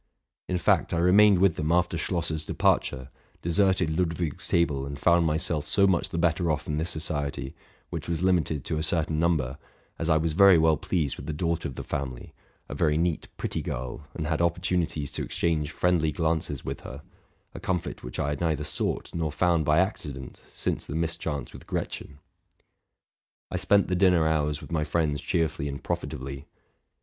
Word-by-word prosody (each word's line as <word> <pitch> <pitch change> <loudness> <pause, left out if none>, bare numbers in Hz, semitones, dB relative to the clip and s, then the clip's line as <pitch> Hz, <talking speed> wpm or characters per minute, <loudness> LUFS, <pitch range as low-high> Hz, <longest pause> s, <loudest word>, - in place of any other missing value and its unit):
In 90 - 0
fact, 85 - +2
I - - +1
rem: 90 +3 +4
ned 105 -2 +7
with 95 -2 +3
them 75 +1 0
after 90 0 +2
Schlosser's 80 -2 -1
departure, 65 -3 0 0.3
deserted 85 -1 +2
Ludwi 85 0 0
ig's 70 - -7
table, 75 -6 +1
and 70 +1 -5
found 85 +2 +4
myself 75 -1 0
so 100 - +4
much 95 -3 +2
the - - -4
better 85 0 +1
off 75 -2 -1
in 75 0 -2
this 80 +2 -1
society, 75 -4 -2 0.4
which - - -5
was 85 +1 -1
limited 80 -6 +1
to 80 -2 -1
a - - -1
certain 80 -1 0
number, 75 -5 +1 0.4
as 80 - -1
I 80 - +5
was 80 0 0
very 100 +1 +7
well 80 0 +4
pleased 75 -3 -1
with - - -9
the 80 - -2
daughter 85 +2 -1
of 65 - -8
the - - -5
family, 65 -4 -5 0.3
a - - -6
very 75 0 +2
neat, 85 -1 0
pretty - - -2
girl, 65 +4 -5
and 75 - -3
had 75 +1 0
opportunities 85 -4 0
to - - -3
exchange 80 -3 0
fr 90 +2 +1
iendly 80 -3 +2
glances 80 -4 -1
with - - -4
her, 70 +3 -9 0.5
—a - - -7
comfort 90 -2 -3
which 60 - -7
I - - 0
had 75 -1 -3
neither 80 -3 0
sought 75 - -2
nor 80 -3 -1
found 85 +1 +2
by 75 +1 +3
accident 75 -8 -2
since - - -2
the 70 - -6
mischance 80 -4 -2
with - - -12
Gretchen. 75 - -4 1.3
I - - -1
spent 100 0 +3
the - - -1
dinner 90 -3 +4
hours 75 -1 0
with 75 - -11
my 80 -2 +1
friends 75 -3 0
cheerfully 80 -3 -1
and 70 0 -6
profitably. 70 +2 -4
80 Hz, 190 wpm, -27 LUFS, 75-85 Hz, 1.3 s, ned